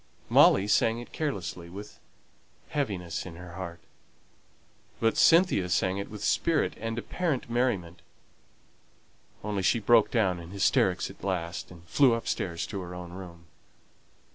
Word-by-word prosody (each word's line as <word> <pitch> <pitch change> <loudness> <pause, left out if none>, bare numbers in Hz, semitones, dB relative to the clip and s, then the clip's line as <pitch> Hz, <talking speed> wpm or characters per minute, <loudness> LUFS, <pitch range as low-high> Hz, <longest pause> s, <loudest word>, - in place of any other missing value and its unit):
Molly 95 +1 +6
sang 115 +2 +3
it 120 - -9
carelessly, 95 - -4
with 100 +4 -10 0.7
heaviness 95 - -2
at 90 - -8
her 90 0 -10
heart; 85 -2 -7 1.2
but 115 0 +2
Cynthia 165 - +4
sang 95 +3 +1
it 100 - -5
with 105 -1 -8
spirit 165 -3 +1
and 115 +1 -4
apparent 140 -2 -2
merriment; 95 -9 -1 1.4
only 105 -2 -2
she 95 +5 +3
broke 115 0 +4
down 95 -7 +1
in 85 0 -10
hysterics 100 +1 +1
at - - -18
last, 90 -3 -3
and 85 -2 -14
flew 125 - +4
upstairs 90 -6 -3
to 100 -3 -5
her 90 0 -7
own 90 -1 -8
room. 85 -3 -10
95 Hz, 140 wpm, -28 LUFS, 90-115 Hz, 1.4 s, Molly